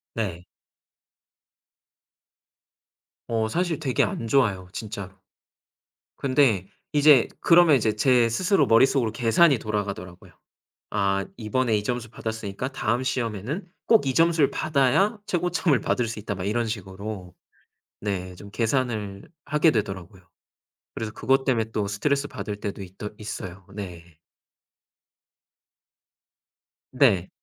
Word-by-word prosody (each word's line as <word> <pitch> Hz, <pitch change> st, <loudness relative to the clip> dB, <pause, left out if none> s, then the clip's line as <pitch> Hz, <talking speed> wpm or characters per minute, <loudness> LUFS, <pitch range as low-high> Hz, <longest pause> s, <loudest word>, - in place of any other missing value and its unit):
네. 90 Hz, -6 st, -3 dB, 2.8 s
어 110 Hz, -1 st, 0 dB
사실 170 Hz, +7 st, -1 dB
되게 135 Hz, -5 st, +1 dB
안 115 Hz, -, -3 dB
좋아요 105 Hz, -8 st, +2 dB
진짜로. 100 Hz, -2 st, -6 dB, 1.0 s
근데 130 Hz, -9 st, +2 dB, 0.2 s
이제 145 Hz, -3 st, +6 dB
그러면 170 Hz, -3 st, +6 dB
이제 110 Hz, -4 st, +1 dB
제 120 Hz, +1 st, +4 dB
스스로 185 Hz, -, +2 dB
머릿속으로 120 Hz, 0 st, +4 dB
계산이 120 Hz, +5 st, +4 dB
돌아가더라고요. 100 Hz, -4 st, -5 dB, 0.6 s
'아 100 Hz, -1 st, +1 dB
이번에 115 Hz, 0 st, 0 dB
이 105 Hz, -, -3 dB
점수 120 Hz, -1 st, -3 dB
받았으니까 110 Hz, +1 st, -5 dB
다음 120 Hz, -1 st, -1 dB
시험에는 125 Hz, -, -3 dB, 0.2 s
꼭 220 Hz, -11 st, +4 dB
이 135 Hz, -, +1 dB
점수를 165 Hz, -3 st, +4 dB
받아야 155 Hz, -, +2 dB
최고점을 175 Hz, -5 st, +1 dB
받을 120 Hz, -, 0 dB
수 110 Hz, -, -5 dB
있다.' 105 Hz, 0 st, -4 dB
막 90 Hz, 0 st, -5 dB
이런 115 Hz, +4 st, 0 dB
식으로 95 Hz, -3 st, -6 dB, 0.7 s
네. 95 Hz, -3 st, -3 dB
좀 100 Hz, +3 st, -12 dB
계산을 110 Hz, -4 st, -2 dB, 0.2 s
하게 150 Hz, +2 st, +4 dB
되더라고요. 95 Hz, -, -4 dB, 0.7 s
그래서 110 Hz, -1 st, -4 dB
그것 135 Hz, +3 st, +1 dB
때문에 115 Hz, -4 st, 0 dB
또 105 Hz, -2 st, -1 dB
스트레스 140 Hz, +8 st, 0 dB
받을 105 Hz, 0 st, -5 dB
때도 100 Hz, -1 st, -5 dB
있더 95 Hz, +3 st, -8 dB
있어요. 95 Hz, -3 st, -7 dB
네. 90 Hz, -5 st, -7 dB, 2.9 s
네. 115 Hz, -9 st, +3 dB
115 Hz, 260 characters per minute, -25 LUFS, 100-135 Hz, 2.9 s, 이제